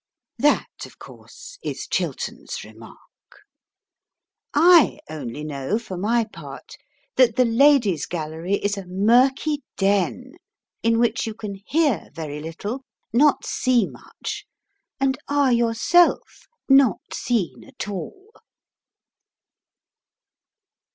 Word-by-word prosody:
That, 295 - +3 0.2
of - - -19
course, - - -13
is - - -4
Chiltern's - - -4
remark. - - -13 1.5
I 335 0 +6
only 145 -2 -6
know, 150 +6 -2
for 225 -5 -7
my 225 +6 +1
part, 215 - -11 0.4
that 245 -4 +5
the 255 - +4
Ladies' 230 - +3
Gallery 165 +3 -3
is 205 0 -2
a 190 - -10
murky 255 +10 +2 0.2
den, 200 - 0 0.5
in 230 0 +2
which 230 -1 +1
you 220 - -5
can 215 -3 -6
hear 295 - +1
very 150 -3 -5
little, 200 - -6 0.3
not 285 +5 +4
see 245 -4 +2
much, - - -8 0.5
and 265 -1 +1
are 285 -2 +2
yourself 235 +9 +2 0.2
not 270 -6 +3
seen 185 - -2
at 260 -6 -8
all. 380 - -7
230 Hz, 105 wpm, -23 LUFS, 190-270 Hz, 1.5 s, I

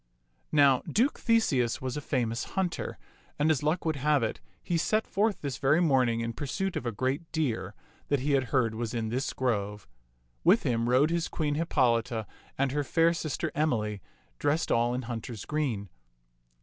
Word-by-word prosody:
Now 140 -4 +5
Duke 250 +7 +2
Theseus 140 - +2
was 130 -1 -4
a 150 - -3
famous 120 -4 -1
hunter, 185 -3 -1 0.4
and 150 +2 +3
as 150 - +1
luck 155 +4 0
would 160 -2 0
have 145 -1 +2
it, 110 - -2 0.2
he 175 - -1
set 215 +6 +1
forth 210 +1 0
this 135 -5 -4
very 140 +4 +3
morning 130 -8 +3
in 115 0 -3
pur 145 - -5
suit 195 +6 -2
of 120 - -3
a - - 0
great 130 +9 -2
deer 115 - -2 0.3
that 145 -2 +1
he 145 +2 0
had 135 -2 +3
heard 120 -3 +1
was 115 +1 -4
in 110 -1 -1
this 130 +5 -1
grove. 105 - -2 0.6
With 195 +7 +5
him 120 -3 0
rode 135 +6 +4
his 170 -1 0
Queen 150 -2 -1
Hippolita 125 -7 +1 0.3
and 135 -1 +1
her 145 +1 0
fair 165 +3 +3
sister 155 -4 -3
Emily, 110 -9 0 0.4
dressed 155 +4 +1
all 120 +1 +2
in 130 - -3
hunter's 115 -2 -6
green. 130 -10 -2
135 Hz, 180 wpm, -29 LUFS, 115-155 Hz, 0.6 s, Now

